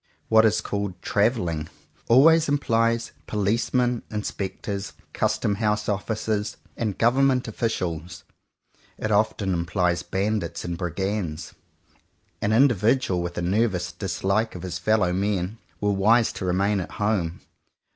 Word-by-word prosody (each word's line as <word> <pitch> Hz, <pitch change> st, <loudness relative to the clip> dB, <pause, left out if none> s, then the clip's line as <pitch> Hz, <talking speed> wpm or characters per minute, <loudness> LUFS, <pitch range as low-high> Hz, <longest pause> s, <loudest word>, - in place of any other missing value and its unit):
What 110 Hz, 0 st, +6 dB
is 110 Hz, 0 st, +3 dB
called 100 Hz, -4 st, -3 dB
"travelling" 90 Hz, -8 st, 0 dB, 0.4 s
always 155 Hz, +6 st, +6 dB
implies 115 Hz, -4 st, +1 dB, 0.2 s
Policemen, 120 Hz, +4 st, +1 dB
In 105 Hz, -1 st, -3 dB
spectors, 100 Hz, 0 st, -4 dB, 0.2 s
Custom 105 Hz, -, 0 dB
House 105 Hz, -1 st, +1 dB
Officers, 105 Hz, 0 st, -2 dB, 0.2 s
and 110 Hz, -5 st, -2 dB
Gov 120 Hz, +3 st, +3 dB
ernment 135 Hz, -2 st, +3 dB
Officials. 90 Hz, -6 st, -3 dB, 0.7 s
It 110 Hz, -, -2 dB
often 105 Hz, -2 st, +1 dB
implies 85 Hz, 0 st, 0 dB
Bandits 95 Hz, -1 st, -2 dB
and 85 Hz, 0 st, -3 dB
Brigands. 90 Hz, -1 st, -3 dB, 0.9 s
An 105 Hz, -, +1 dB
individual 115 Hz, -5 st, +3 dB
with 85 Hz, 0 st, -5 dB
a 90 Hz, -, -1 dB
ner 105 Hz, +7 st, +2 dB
vous 90 Hz, -4 st, -3 dB
dislike 95 Hz, +4 st, -1 dB
of 90 Hz, -, -7 dB
his 90 Hz, -1 st, -4 dB
fellow 100 Hz, -2 st, +2 dB
men, 100 Hz, +2 st, -1 dB, 0.2 s
were 105 Hz, 0 st, +1 dB
wise 110 Hz, +4 st, +3 dB
to 95 Hz, -, -5 dB
remain 95 Hz, +3 st, +1 dB
at 90 Hz, -, -6 dB
home. 100 Hz, -5 st, -1 dB
105 Hz, 130 wpm, -25 LUFS, 90-110 Hz, 0.9 s, What